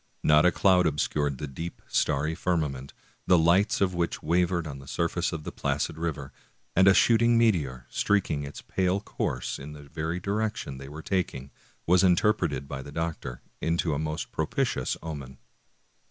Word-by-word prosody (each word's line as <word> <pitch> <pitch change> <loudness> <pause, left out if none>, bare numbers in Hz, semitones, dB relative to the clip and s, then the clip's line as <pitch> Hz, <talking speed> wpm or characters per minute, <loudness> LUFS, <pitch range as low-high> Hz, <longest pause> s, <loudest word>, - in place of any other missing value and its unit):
Not 75 +3 +6
a - - +4
cloud 90 -1 +4
obscured 75 -2 0
the 75 - -4
deep, 80 +5 -7
starry 75 +4 +1
firmament, 75 -6 -2 0.4
the 90 - +6
lights 85 +6 +3
of 95 -2 +2
which 85 -2 -2
wavered 85 +1 +1
on 70 -3 -6
the 70 - -13
surface 85 +3 -1
of 80 -3 -5
the - - -5
placid - - -2
river, 75 -4 -4 0.4
and 95 +1 +5
a 95 - +8
shooting 115 0 +5
meteor, 75 - +1
streaking 95 -8 0
its 70 0 -8
pale 95 +1 0
course 65 -10 -3
in 75 +2 -8
the 75 -1 -11
very 80 +4 -4
direc 105 +4 -1
tion 65 - -6
they 70 0 -9
were 75 +2 -8
taking, 70 -8 -2 0.3
was 90 +1 +4
interpreted 85 - +2
by 70 -1 -5
the 70 - -10
doctor 80 -6 -4 0.2
into 85 -1 0
a 70 - -1
most 75 0 -3
propitious - - -1
omen. 70 -5 -7
80 Hz, 170 wpm, -27 LUFS, 70-90 Hz, 0.4 s, a